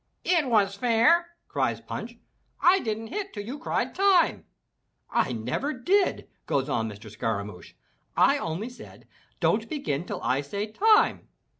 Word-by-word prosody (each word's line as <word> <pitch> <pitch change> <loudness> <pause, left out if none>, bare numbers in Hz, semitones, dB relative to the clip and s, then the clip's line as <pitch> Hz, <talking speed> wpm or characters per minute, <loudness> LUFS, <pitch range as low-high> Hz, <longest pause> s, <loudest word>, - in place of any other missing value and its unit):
"It 340 -6 +2
was 205 -5 +3
fair!" 245 +11 +3 0.2
cries - - -1
Punch, - - -7 0.4
"I 370 +3 +5
didn't 220 - -4
hit 400 +2 -4
till 205 - -5
you 265 +6 -6
cried - - -1
Time.' 385 -3 +3 0.4
" - - -50 0.3
"I - - +1
never 125 - -2
did!" 370 +11 +1 0.2
goes 135 0 0
on 115 -5 -1
Mr. 105 +1 -11
Scaramouch. 105 -3 -4 0.4
"I - - +5
only 175 +9 -3
said, 245 - -14 0.3
'Don't - - +1
begin 225 - -2
till 195 0 -5
I 130 +2 +1
say 200 +9 -4
Time.' 435 - +3
225 Hz, 150 wpm, -26 LUFS, -, 0.4 s, I